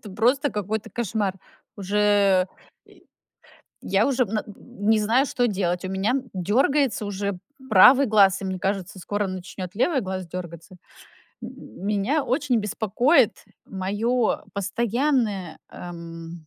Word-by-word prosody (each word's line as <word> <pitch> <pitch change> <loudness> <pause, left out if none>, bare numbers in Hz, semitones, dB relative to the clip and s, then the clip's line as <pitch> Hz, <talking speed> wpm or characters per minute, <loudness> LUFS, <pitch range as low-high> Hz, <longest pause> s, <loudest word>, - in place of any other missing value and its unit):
это 210 - -11
просто 265 +8 +1
какой-то 210 +1 -4
кошмар. 210 -4 -2 0.4
Уже, 200 +1 -4 0.9
э, - - -20
и - - -23 0.7
я 195 +3 +1
уже, 265 -2 +1
м, 215 0 -2
н - - -4 0.4
не 220 - +5
знаю, 235 +6 +2
что 245 -2 0
делать. 180 -3 -1
У 185 - -3
меня, 190 +3 -1
м, 260 -2 -2
дёргается 235 - +1
уже 200 -1 -3 0.3
правый 250 +8 +7
глаз, 200 -4 +4
и - - -4
мне 190 -1 -3
кажется, 195 0 -3
скоро 205 +3 -2
начнёт 185 -1 -7
левый 270 +4 +2
глаз 185 -1 -4
дёргаться. 170 +1 -8 0.7
М - - -6 0.4
меня 210 +9 +1
очень 255 -2 0
беспокоит 220 - +2 0.2
моё 210 +5 -1
постоянное, 215 - -1
эм, 170 -1 -9
205 Hz, 135 wpm, -24 LUFS, 185-240 Hz, 0.9 s, правый